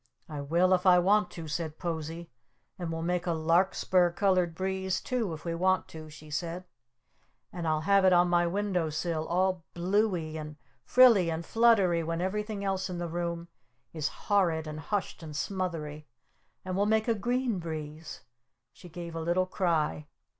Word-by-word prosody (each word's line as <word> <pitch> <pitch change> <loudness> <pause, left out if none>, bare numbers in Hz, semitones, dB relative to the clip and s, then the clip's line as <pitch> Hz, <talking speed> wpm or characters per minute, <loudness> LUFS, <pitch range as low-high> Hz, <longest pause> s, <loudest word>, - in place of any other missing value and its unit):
"I 150 -2 -5
will 170 +6 +2
if 185 +1 +2
I 180 -1 +7
want 205 +4 +3
to!" 165 -2 -8
said 155 0 -4
Posie. 165 -1 -5 0.5
"And 170 -2 -3
we'll 165 0 -3
make 180 +1 -1
a 170 - +1
Larkspur 175 +2 +2
Colored 180 -2 +1
Breeze 190 +1 -1
too, 235 -7 -2
if 155 - -13
we 170 - -2
want 185 +2 +1
to!" 155 -1 -9
she 150 0 -13
said. 170 +4 -3 0.9
"And 170 -2 -4
I'll 155 -1 +1
have 195 +4 +4
it 185 - +6
on 175 0 +5
my 175 0 +2
window 185 -3 -1
sill 160 0 -2
all 185 0 +1
blue 200 +5 +2
y 160 -4 -4
and 150 0 -8 0.3
frilly 230 -9 +6
and 165 +1 -3
fluttery 210 -7 +4
when 165 +1 -3
everything 205 +2 -2
else 190 0 -1
in 180 - -4
the 175 0 -3
room 170 0 -3 0.5
is 155 -3 -1
horrid 175 -6 0
and 155 0 -6
hushed 200 +3 -3
and 155 -2 -8
smothery! 155 -5 -4 0.6
And 185 -1 -3
we'll 200 +2 +2
make 220 +1 +2
a 230 - +3
Green 240 0 -1
Breeze 155 -1 -7 0.2
" - - -55
She 180 - -14
gave 170 0 -7
a 165 - -3
little 175 +3 +1
cry. 160 -5 -1
175 Hz, 180 wpm, -29 LUFS, 160-190 Hz, 0.9 s, I